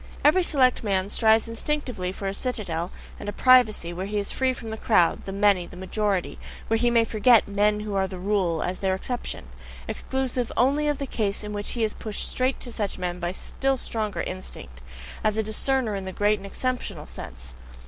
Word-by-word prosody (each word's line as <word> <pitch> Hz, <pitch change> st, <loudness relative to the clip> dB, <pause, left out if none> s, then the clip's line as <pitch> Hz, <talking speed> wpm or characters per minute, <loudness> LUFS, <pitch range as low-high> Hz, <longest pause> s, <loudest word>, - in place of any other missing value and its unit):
Every 320 Hz, +6 st, +6 dB
select 265 Hz, -9 st, +3 dB
man 195 Hz, -2 st, 0 dB
strives 220 Hz, +1 st, +4 dB
instinctively 230 Hz, -5 st, -2 dB
for 195 Hz, +1 st, -5 dB
a 195 Hz, -, -1 dB
citadel 190 Hz, -8 st, -2 dB, 0.3 s
and 205 Hz, -, -5 dB
a -, -, -1 dB
privacy, 220 Hz, -7 st, +4 dB
where 185 Hz, +3 st, -4 dB
he 210 Hz, +1 st, -2 dB
is 200 Hz, -1 st, -1 dB
FREE 260 Hz, -1 st, +1 dB
from 225 Hz, -3 st, -7 dB
the 220 Hz, -, -4 dB
crowd, 180 Hz, -7 st, +3 dB
the 195 Hz, -, -4 dB
many, 200 Hz, -3 st, +3 dB
the 180 Hz, -, -12 dB
majority 195 Hz, 0 st, -1 dB, 0.3 s
where 225 Hz, -, +3 dB
he 240 Hz, 0 st, +3 dB
may 230 Hz, -1 st, +4 dB
forget 225 Hz, +1 st, +5 dB
"men 210 Hz, +1 st, +2 dB
who 210 Hz, -1 st, -4 dB
are 190 Hz, -1 st, +1 dB
the 185 Hz, -, -7 dB
rule," 185 Hz, -4 st, 0 dB
as 185 Hz, -, -2 dB
their 190 Hz, -1 st, +1 dB
exception; 245 Hz, +5 st, -4 dB, 0.4 s
exclusive 260 Hz, -2 st, -2 dB
only 280 Hz, +5 st, +3 dB
of 295 Hz, -1 st, +1 dB
the 280 Hz, -, -3 dB
case 210 Hz, -5 st, -1 dB
in 210 Hz, 0 st, -5 dB
which 205 Hz, 0 st, -2 dB
he 235 Hz, -, -1 dB
is 215 Hz, -, 0 dB
pushed 215 Hz, -2 st, -2 dB
straight 255 Hz, +1 st, 0 dB
to 245 Hz, -, -3 dB
such 205 Hz, -4 st, -3 dB
men 180 Hz, -1 st, -3 dB
by 175 Hz, -1 st, -1 dB
a -, -, -4 dB
still 270 Hz, +5 st, -1 dB
stronger 220 Hz, -4 st, -3 dB
instinct, 65 Hz, -, -7 dB, 0.4 s
as 215 Hz, 0 st, +2 dB
a 220 Hz, -, +2 dB
discerner 225 Hz, +2 st, 0 dB
in 195 Hz, -1 st, -4 dB
the 190 Hz, -, -4 dB
great 205 Hz, +2 st, +2 dB
and 200 Hz, -, -8 dB
exceptional 205 Hz, -, -3 dB
sense. 65 Hz, -1 st, -9 dB
210 Hz, 210 wpm, -25 LUFS, 190-245 Hz, 0.4 s, Every